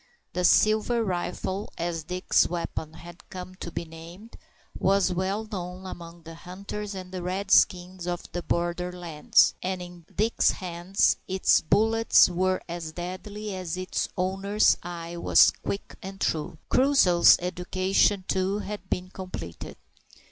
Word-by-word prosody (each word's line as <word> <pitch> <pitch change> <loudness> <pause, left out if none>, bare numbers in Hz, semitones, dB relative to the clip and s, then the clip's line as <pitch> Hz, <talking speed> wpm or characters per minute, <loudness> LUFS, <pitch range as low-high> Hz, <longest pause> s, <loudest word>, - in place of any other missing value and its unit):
The 180 +1 -1
"silver 215 +5 +4
rifle," 190 +1 -3
as 165 -1 -3
Dick's 180 +2 +2
weapon 165 -2 -4
had 170 +1 -13
come 185 0 -8
to 170 - -6
be 170 - -4
named, 165 +7 -12 0.4
was 195 -1 +2
well 190 +4 -1
known 185 -3 -6
among 170 -2 -9
the 165 - -10
hunters 200 +4 -7
and 185 -1 -8
the 185 -1 -5
Redskins 185 -1 +2
of 175 -1 -3
the 175 - -3
border 175 +1 -1
lands, 170 -4 +2
and 185 0 -2
in 175 -2 -10
Dick's 220 +3 +2
hands 180 +1 0
its 190 0 +3
bullets 225 +6 +4
were 185 +1 0
as 170 -2 -6
deadly 195 +4 -6
as 180 -2 -4
its 185 0 -2
owner's 195 +3 +2
eye 170 0 -7
was - - +6
quick 200 - -6
and 195 +1 -8
true. 155 -5 -2
Crusoe's 255 -11 +5
education, 185 +2 +1
too, 190 +2 0
had 210 0 -6
been 180 +1 -3
completed. 185 - -8
185 Hz, 140 wpm, -26 LUFS, 175-195 Hz, 0.4 s, was